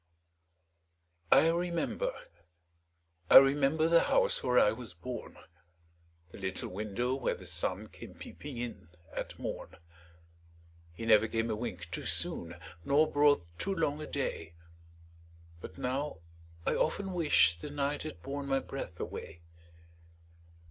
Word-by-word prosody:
I 160 - +7
remember, 175 - -1 1.2
I - - +11
remember, 140 +3 +5
The 170 0 +5
house - - +3
where 125 0 +1
I 105 - +6
was 110 -5 -8
born, 120 +9 -7 0.9
The - - -11
little 95 -1 -3
window 105 +6 -2
where 135 -2 -1
the - - -12
sun - - -1
Came - - -12
peeping 145 -4 -9
in 120 -8 -6 0.3
at - - -5
morn; - - -6 1.2
He 85 +7 -7
never 110 0 +5
came 115 +1 -1
a - - 0
wink 90 -7 -6
too - - -3
soon, 85 0 -1 0.3
Nor 150 - +3
brought 145 -9 +4
too 195 0 -1
long 155 -3 0
a 155 - -6
day, 85 - -3 1.0
But 80 0 -10
now, 135 +4 -2 0.5
I - - +2
often 190 +4 0
wish 145 - +4
the 145 - -6
night 145 0 -1
Had 155 - -7
borne 140 +1 -4
my 135 0 +2
breath 135 -12 -7
away! 85 0 -7
135 Hz, 135 wpm, -31 LUFS, 105-150 Hz, 1.2 s, I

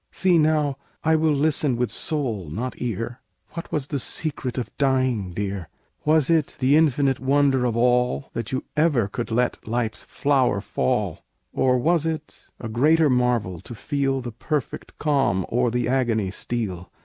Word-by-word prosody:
"See, 180 -3 +3
now; 150 -3 +2 0.3
I 160 +1 +4
will 155 -1 +2
listen 145 -2 +1
with 120 -2 -1
soul, 115 - -2
not 120 +11 -3
ear: 120 +1 -3 0.3
What 170 - -7
was 150 -4 -1
the 145 0 -3
secret 135 -2 -2
of 125 - -4
dying, 130 -7 +1
dear? 95 -2 -4 0.4
"Was 155 -2 +4
it 165 -3 +1
the 135 +2 +4
infinite 140 -4 +3
wonder 135 -1 +2
of 120 -2 0
all 125 +2 +2
That 115 +3 -4
you 130 - -2
ever 150 -9 +3
could 120 +4 -4
let 120 0 -1
life's 115 -1 -2
flower 135 -7 +1
fall? 65 - -1 0.3
"Or 125 -1 +3
was 165 +4 +2
it 155 -2 -6
a 115 - -5
greater 150 +7 +3
marvel 120 -8 +1
to 120 - -9
feel 135 +2 -1
The 120 -1 -6
perfect 140 +4 -4
calm 135 - +1
o'er 125 +1 +2
the 120 -1 -1
agony 115 -6 +1
steal? 95 -4 -4
130 Hz, 160 wpm, -24 LUFS, 115-145 Hz, 0.4 s, I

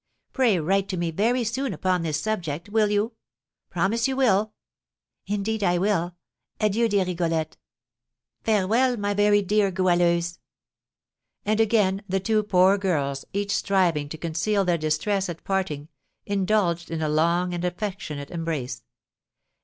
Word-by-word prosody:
Pray 235 -9 +3
write 195 +5 0
to 185 - -2
me 170 -1 -1
very 235 +8 +1
soon 255 +4 -2
upon 185 -2 0
this 155 -2 -1
subject, 170 -4 -3
will 215 0 +2
you? 210 +3 +1 0.6
Promise 210 +7 +1
you 265 - -1
will!" 215 -5 +2 0.7
"Indeed 210 +1 -1
I 175 -2 +3
will! 180 -2 0 0.4
Adieu, 220 +2 +2
dear 200 -2 +2
Rigolette!" 165 -3 -1 0.9
"Farewell, 225 +4 +2
my 205 -1 -1
very 205 0 +3
dear 205 +1 +2
Goualeuse!" 175 -2 +1 1.1
And 215 +1 +1
again 210 -3 +2
the 195 +1 +1
two 215 +3 +1
poor 195 -1 +4
girls, 140 -8 -1
each 200 +1 -1
striving 170 -7 +1
to 160 - -6
conceal 175 +5 0
their 175 -2 +1
distress 180 +6 0
at 165 -2 -7
parting, 185 -7 -2 0.4
indulged 190 -4 0
in 160 -1 -3
a - - +1
long 170 +4 +1
and 175 0 -3
affectionate 180 -6 -4
embrace. 155 -8 -3
190 Hz, 140 wpm, -25 LUFS, 170-210 Hz, 1.1 s, poor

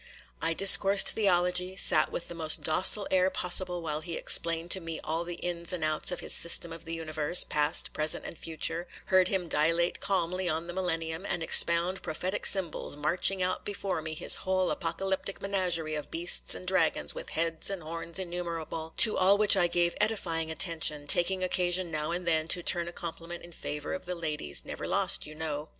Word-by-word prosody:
I 165 - 0
discoursed 195 +1 +6
theology,—sat 180 -2 +1
with - - -6
the - - -8
most 160 -2 -2
docile 190 +5 +4
air 185 0 +2
possible 180 -1 0
while 155 -1 -4
he 165 0 -7
explained 165 +1 +2
to 190 - +5
me 165 -2 -6
all 160 +2 -3
the 175 0 -7
ins 170 0 -4
and 175 -3 -4
outs 155 +2 -1
in 180 - -4
his - - -1
system 170 0 +3
of 165 0 -11
the 165 0 -5
universe, 155 0 +3
past, 150 -1 +1
present, 155 0 0
and - - -8
future,—heard 170 +4 -2
him 185 -2 -3
dilate 165 +3 0
calmly 185 -1 -2
on 160 +1 -3
the 175 - -8
Millennium, 165 -2 -3
and 175 -4 -3
expound 170 +3 +3
prophetic 185 +5 -3
symbols, 185 -7 0
marching 180 +5 0
out 185 0 -3
before 195 -4 -4
me 155 0 -7
his 170 - +4
whole 185 -1 -1
apocalyptic 190 +3 -4
menagerie 180 -5 -2
of 150 -1 -6
beasts 170 +2 +1
and 185 - -10
dragons 180 -3 +1
with - - -8
heads 165 +1 -2
and 195 -4 -6
horns 165 +2 -8
innumerable, 170 -3 -6
to 220 - +7
all 190 +2 +4
which 210 0 +5
I 175 - +2
gave 175 0 0
edifying 170 -7 -1
attention, 160 -3 0
taking 185 +5 +4
occasion 180 -1 0
now 155 0 -4
and 175 +1 -5
then 160 -1 0
to 175 +1 0
turn 170 -1 +1
a - - -6
compliment 170 0 -8
in 175 - -13
favour 150 -2 -6
of 185 - -7
the 180 0 -5
ladies,—never 150 - -5
lost, - - 0
you 155 - -12
know. 155 -1 -6
170 Hz, 185 wpm, -28 LUFS, 160-185 Hz, -, to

